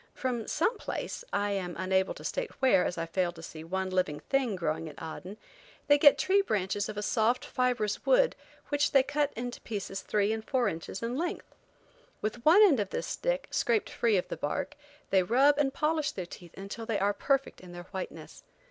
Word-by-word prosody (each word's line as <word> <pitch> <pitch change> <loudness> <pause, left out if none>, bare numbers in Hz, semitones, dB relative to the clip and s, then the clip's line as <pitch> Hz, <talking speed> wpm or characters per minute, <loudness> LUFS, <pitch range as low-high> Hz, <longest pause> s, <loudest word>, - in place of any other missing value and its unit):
From 245 -4 -2
some 460 -1 0
place, - - -4
I 205 0 0
am 185 -3 -3
unable 190 +1 +1
to - - -11
state - - -2
where, 255 -9 +4
as 180 - -2
I 165 - -1
failed 175 +1 -1
to 165 - -11
see 160 -1 -8
one 190 +3 -2
living 180 -6 0
thing 265 -6 0
growing 160 -2 -2
at 150 - -12
Aden, 180 +5 -7 0.5
they 290 0 +5
get 290 -1 +7
tree 395 +1 +3
branches 205 - -1
of 210 - -6
a 210 - -2
soft, 230 +3 +1
fibrous 245 -5 0
wood - - +4 0.3
which 290 0 +1
they 270 -2 +6
cut 290 +1 0
into 245 +1 -5
pieces 195 -2 -5
three 210 0 +1
and 220 0 -4
four 255 0 +1
inches 165 +5 -5
in 240 +2 -2
length. 345 +1 -4 0.7
With 220 +3 -4
one 350 +9 +7
end 320 - +5
of 200 -2 -1
this - - -3
stick, - - -2
scraped 455 -4 +1
free 225 -4 +2
of 180 - -1
the - - -5
bark, 150 - -3 0.4
they 190 - +5
rub 270 +9 +4
and 275 -2 +2
polish 305 +1 0
their 185 - -4
teeth 175 -1 -12
until 200 +4 -7
they 225 -3 0
are 200 +1 +1
perfect 275 +5 0
in 180 -1 -12
their 175 0 -9
whiteness. 190 -2 -7
215 Hz, 205 wpm, -30 LUFS, 185-280 Hz, 0.7 s, get